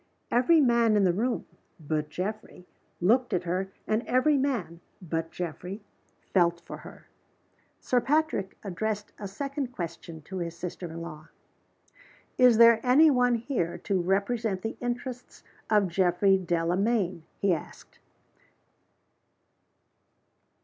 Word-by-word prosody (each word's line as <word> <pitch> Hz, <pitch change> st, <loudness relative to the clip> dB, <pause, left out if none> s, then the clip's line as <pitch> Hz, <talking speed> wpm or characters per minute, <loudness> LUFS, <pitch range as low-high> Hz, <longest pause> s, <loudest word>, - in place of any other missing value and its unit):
Every 255 Hz, +8 st, +4 dB
man 235 Hz, -5 st, +4 dB
in 205 Hz, -, +3 dB
the 180 Hz, -2 st, +3 dB
room 235 Hz, +6 st, -1 dB, 0.3 s
(but 150 Hz, -1 st, -2 dB
Geoffrey) 190 Hz, +2 st, -5 dB, 0.3 s
looked 240 Hz, +8 st, +2 dB
at 180 Hz, -1 st, 0 dB
her; 185 Hz, +2 st, -2 dB
and 215 Hz, +1 st, +1 dB
every 255 Hz, +4 st, +3 dB
man 245 Hz, -12 st, -1 dB, 0.2 s
(but 165 Hz, -2 st, -3 dB
Geoffrey) 180 Hz, +4 st, -6 dB, 0.5 s
felt 170 Hz, -2 st, +3 dB
for -, -, -7 dB
her. -, -, -13 dB, 0.7 s
Sir 250 Hz, -1 st, +1 dB
Patrick 295 Hz, -9 st, 0 dB
addressed 210 Hz, +2 st, -3 dB
a 200 Hz, -, -5 dB
second 275 Hz, +7 st, -4 dB
question 170 Hz, -5 st, -7 dB
to 190 Hz, +5 st, -7 dB
his 170 Hz, -1 st, -4 dB
sister 175 Hz, 0 st, -6 dB
in 165 Hz, +1 st, -6 dB
law. 155 Hz, -2 st, -9 dB, 1.1 s
"Is 250 Hz, -3 st, +6 dB
there 230 Hz, -1 st, +7 dB
any 295 Hz, +5 st, +6 dB
one 245 Hz, -2 st, +3 dB
here 225 Hz, -, -2 dB
to 190 Hz, -2 st, 0 dB
represent 200 Hz, +2 st, 0 dB
the 225 Hz, -, -3 dB
interests 245 Hz, +1 st, -5 dB, 0.3 s
of 210 Hz, -2 st, +4 dB
Mr. -, -, -1 dB
Geoffrey 185 Hz, +2 st, +3 dB
Delamayn?" 180 Hz, +2 st, 0 dB, 0.2 s
he 200 Hz, -2 st, +2 dB
asked. 160 Hz, -, -8 dB
200 Hz, 130 wpm, -28 LUFS, 175-240 Hz, 1.1 s, there